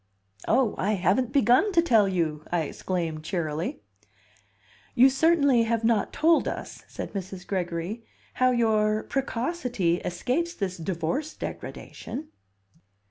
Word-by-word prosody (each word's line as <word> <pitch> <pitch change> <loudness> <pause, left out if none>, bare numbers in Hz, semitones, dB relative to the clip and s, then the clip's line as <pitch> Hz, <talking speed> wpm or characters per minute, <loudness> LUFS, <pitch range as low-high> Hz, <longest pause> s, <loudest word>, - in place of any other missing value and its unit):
"Oh, 255 -5 +3
I 205 +3 +1
haven't 205 +6 +1
begun 275 - +4
to 335 - +5
tell 225 -11 +4
you!" 160 -5 -1
I 175 -1 +2
exclaimed 160 0 -3
cheerily. 160 - -3 1.1
"You 260 +3 +7
certainly 285 -3 +4
have 230 0 0
not 225 -2 +2
told 325 +1 +3
us," - - -6
said - - -7
Mrs. 190 -2 -6
Gregory, 180 +3 -3 0.3
"how 255 0 +3
your 215 -3 +2
'precocity' 250 - -1
escapes 260 - -1
this 190 -2 -3
divorce 175 - -3
degradation." 295 +5 -7
215 Hz, 120 wpm, -26 LUFS, 175-260 Hz, 1.1 s, You